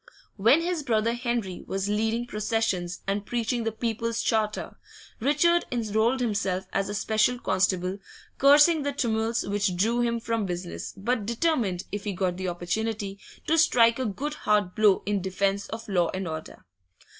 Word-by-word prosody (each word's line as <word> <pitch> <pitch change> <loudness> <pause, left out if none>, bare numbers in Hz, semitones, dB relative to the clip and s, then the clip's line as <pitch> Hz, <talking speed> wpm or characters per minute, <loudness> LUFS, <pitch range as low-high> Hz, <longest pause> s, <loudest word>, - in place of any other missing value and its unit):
When 230 +10 +4
his 345 -1 -1
brother 230 -4 +1
Henry 235 -6 -3
was 195 0 -2
leading 220 +3 0
processions 210 -6 -2
and 200 +1 -1
preaching 235 +1 -2
the 225 - 0
People's 230 +1 -2
Charter, 215 -1 -1 0.4
Richard 300 +7 +3
enrolled 230 +2 +1
himself 200 -5 -1
as 195 0 0
a 205 - -3
special 220 +4 +1
constable, 185 -3 0 0.4
cursing 295 +3 +6
the 285 0 -2
tumults 230 -3 0
which 200 -2 0
drew 230 +6 +2
him 235 -1 0
from 230 -3 -2
business, 175 0 -5
but 210 +1 -1
determined, 235 - 0
if 205 0 -5
he 205 - -2
got 180 -1 -1
the 185 0 -3
opportunity, 200 +3 -3 0.3
to 325 +1 +3
strike 235 -7 +4
a 260 - -1
good 275 +9 -3
hard 210 -9 +1
blow 210 -3 +3
in 205 -1 0
defence 195 +2 -1
of 225 0 -7
law 180 -4 +1
and 185 -1 -3
order. 160 -1 -7
220 Hz, 160 wpm, -26 LUFS, 195-240 Hz, 0.4 s, cursing